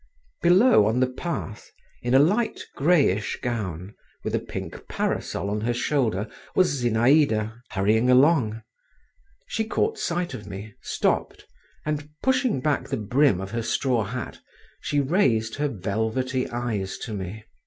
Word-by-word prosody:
Below, 180 - +6
on 110 +3 +1
the 130 - +4
path, 130 -6 -5 0.3
in 120 +1 +1
a - - +9
light 200 - +2 0.2
greyish 140 - +2
gown, 100 -6 -4 0.3
with - - -3
a - - +2
pink - - -7
parasol - - -2
on 105 0 -1
her 120 +2 0
shoulder, 120 -6 0 0.3
was 145 -8 +2
Zinaïda, 115 -2 +3
hurrying 110 +4 +2
along. 125 -5 +4 0.8
She 220 - -2
caught 435 - -1
sight 175 +1 -2
of 105 - -8
me, 100 +2 -8
stopped, - - -1 0.4
and 150 -1 -3
pushing 255 - +2
back 150 0 0
the - - -1
brim 115 0 +2
of 95 +1 -6
her 115 0 -2
straw 120 +1 +1
hat, 125 +4 -6 0.4
she 145 - -1
raised 130 - +1
her 150 0 +1
velvety 110 +4 -2
eyes 115 -6 -3
to 110 - -5
me. 100 +2 -6
120 Hz, 145 wpm, -25 LUFS, 110-150 Hz, 0.8 s, a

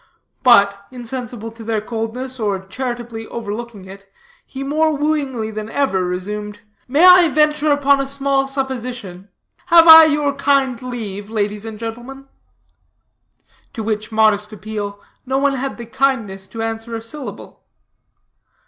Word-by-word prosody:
But, 200 -5 +4
insensible 240 -2 -6
to 225 0 -12
their 220 -1 -1
coldness, 235 +4 -5
or 200 -3 -2
charitably 240 0 -5
overlooking 220 -2 -6
it, 195 +1 -13 0.4
he 270 0 -7
more 305 +2 +1
wooingly 280 -7 -1
than 215 0 -5
ever 245 -9 0
resumed: 205 +4 -5 0.3
"May 290 +7 +4
I 365 -1 +8
venture 300 0 +2
upon 280 -1 +3
a 275 - -3
small 275 0 0
supposition? 245 -8 -5 0.4
Have 335 -1 +7
I 320 0 +11
your 295 -2 +1
kind 275 -3 +1
leave, 215 -5 -6
ladies 210 -1 -2
and 220 -1 -7
gentlemen?" 240 +5 -8 1.5
To 225 - -5
which 215 0 -3
modest 215 -1 +2
appeal, 205 -1 -6 0.3
no 265 +1 0
one 275 0 +2
had 270 0 -4
the 235 - -8
kindness 225 -6 -1
to 225 +2 -6
answer 225 +1 -4
a 225 - -5
syllable. 230 -3 -8
235 Hz, 140 wpm, -19 LUFS, 210-275 Hz, 1.5 s, I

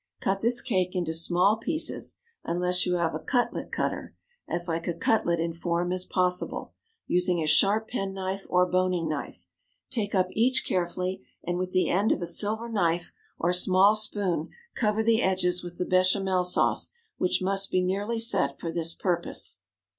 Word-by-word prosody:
Cut 195 0 -1
this 235 +2 +2
cake 185 -4 -1
into 175 -3 -1
small 175 +5 +3
pieces 310 +8 -1 0.3
(unless 180 +1 0
you 180 - +1
have 170 -2 0
a - - -3
cutlet 245 -2 -1
cutter), - - -3 0.3
as 175 +1 0
like 165 0 -3
a 170 - -1
cutlet 170 -2 +1
in 165 0 -1
form 170 +1 -2
as 185 0 -1
possible, 180 -1 -1 0.3
using 180 0 +1
a 160 - -1
sharp 200 +8 +3
penknife 195 -3 -4
or 180 0 +4
boning 180 -2 0
knife. 150 -2 -5 0.5
Take 210 -5 -2
up 185 -1 +2
each 250 +5 +1
carefully, 180 +1 -2 0.2
and 175 +1 -2
with 185 0 -3
the 185 0 +2
end 200 +4 +2
of - - +1
a - - -1
silver 210 +7 -1
knife 175 -6 -1 0.2
or 175 +2 +1
small 185 +3 +5
spoon 200 -6 0 0.2
cover 215 -1 0
the 225 +1 +3
edges 180 -1 +1
with 175 0 -9
the 180 - -1
béchamel 185 0 +2
sauce, 180 - +2 0.3
which 180 0 +1
must 195 +1 +2
be 185 - +1
nearly 200 +5 -1
set 180 -12 +1
for 165 - -4
this 165 0 -1
purpose. 175 - 0
185 Hz, 170 wpm, -27 LUFS, 175-200 Hz, 0.5 s, small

